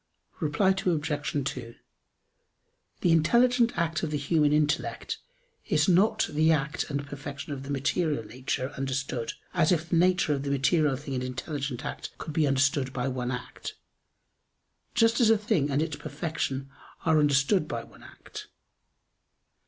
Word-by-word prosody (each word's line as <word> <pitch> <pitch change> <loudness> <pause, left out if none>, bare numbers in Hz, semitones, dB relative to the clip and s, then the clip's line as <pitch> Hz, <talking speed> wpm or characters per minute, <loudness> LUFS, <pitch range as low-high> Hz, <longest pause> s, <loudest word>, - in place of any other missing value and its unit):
Reply 155 +4 +2
Obj. 150 -6 0
2: 115 -1 -8 1.3
The 175 - +3
intelligent 235 +9 +4
act 170 0 0
of 160 - -2
the 150 - -1
human 150 +1 +2
intellect 150 0 0 0.5
is - - +2
not 190 +4 +4
the 155 +2 +3
act 150 -1 0
and 140 0 -2
perfection 140 0 -6
of 135 - -6
the 135 - -9
material 145 -1 0
nature 130 +3 -3
understood, 135 -3 -2 0.2
as 170 -3 +3
if 165 -2 0
the 170 - +3
nature 180 -2 +3
of 140 - -2
the 140 - -3
material 140 +1 +2
thing 140 +1 -6
and 130 -1 -2
intelligent 130 +1 -4
act - - -6
could 155 - -6
be 155 -2 +2
understood 135 0 +2
by 125 0 -1
one 125 -2 -2
act; 125 -1 -6 1.2
just 230 0 +4
as 225 - +5
a 225 - +6
thing 165 -9 +1
and 145 +2 +1
its 155 -2 -4
perfection 145 -2 -3 0.3
are 160 -1 +4
understood 145 +4 +3
by 115 -4 -4
one - - -17
act. - - -11
150 Hz, 150 wpm, -28 LUFS, 135-165 Hz, 1.3 s, a